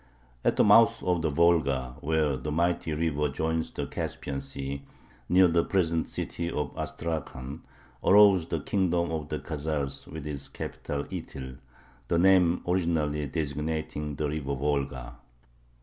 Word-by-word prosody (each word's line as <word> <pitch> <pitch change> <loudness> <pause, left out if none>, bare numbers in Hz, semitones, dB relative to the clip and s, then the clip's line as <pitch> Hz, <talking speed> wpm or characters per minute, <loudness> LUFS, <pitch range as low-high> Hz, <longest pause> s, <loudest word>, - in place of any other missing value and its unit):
At - - +2
the - - +4
mouth - - +6
of 90 -2 +1
the 80 - +1
Volga, 70 -6 +2
where 75 -2 +1
the 75 +3 -4
mighty 85 +1 0
river 75 -1 0
joins 80 +3 -1
the - - -4
Caspian 70 -1 -4
Sea, 70 0 -5 0.5
near 90 +1 +6
the 85 0 +3
present 85 -4 0
city 85 0 -3
of 75 -4 -2
Astrakhan, 75 -3 -4 0.4
arose 100 -4 +6
the 80 -3 -2
kingdom 85 -2 +1
of 80 -2 -3
the 75 - -2
Khazars 75 -3 -3
with 80 -2 -7
its 70 -2 -5
capital 70 -1 -4
Ityl, 65 -2 -7 0.5
the 85 - +1
name 90 -1 +4
originally 80 -5 0
designating 75 0 -3
the 75 +2 -1
river 70 -2 -2
Volga. 70 -3 -2
75 Hz, 140 wpm, -28 LUFS, 70-85 Hz, 0.5 s, mouth